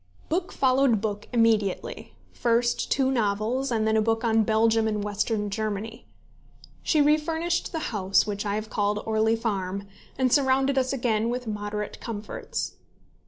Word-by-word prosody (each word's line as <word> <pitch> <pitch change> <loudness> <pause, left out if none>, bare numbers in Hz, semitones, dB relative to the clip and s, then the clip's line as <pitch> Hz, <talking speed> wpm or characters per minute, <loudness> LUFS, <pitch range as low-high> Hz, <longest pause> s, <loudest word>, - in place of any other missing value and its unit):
Book 345 +3 -1
followed 260 -3 +3
book 210 -1 -4
immediately, 225 -5 0 0.2
first 240 0 +1
two 265 -1 +2
novels, 230 +3 0
and 220 -2 0
then 220 - +2
a 220 - +4
book 225 +1 0
on 225 -1 +3
Belgium 220 +1 +3
and 210 -1 -1
Western 210 0 -1
Germany. 215 +1 -4 0.7
She 310 - +2
refurnished 320 +3 +1
the 320 -7 -4
house 195 -2 +2
which 205 -1 -3
I 205 -1 -1
have 215 0 -5
called 205 0 0
Orley 220 0 +2
Farm, 200 -4 -3 0.3
and 255 -2 +2
surrounded 270 -1 +3
us 260 -1 +1
again 235 -4 0
with 250 +1 -3
moderate 210 -1 -4
comforts. 215 -2 -5
225 Hz, 150 wpm, -26 LUFS, 210-255 Hz, 0.7 s, a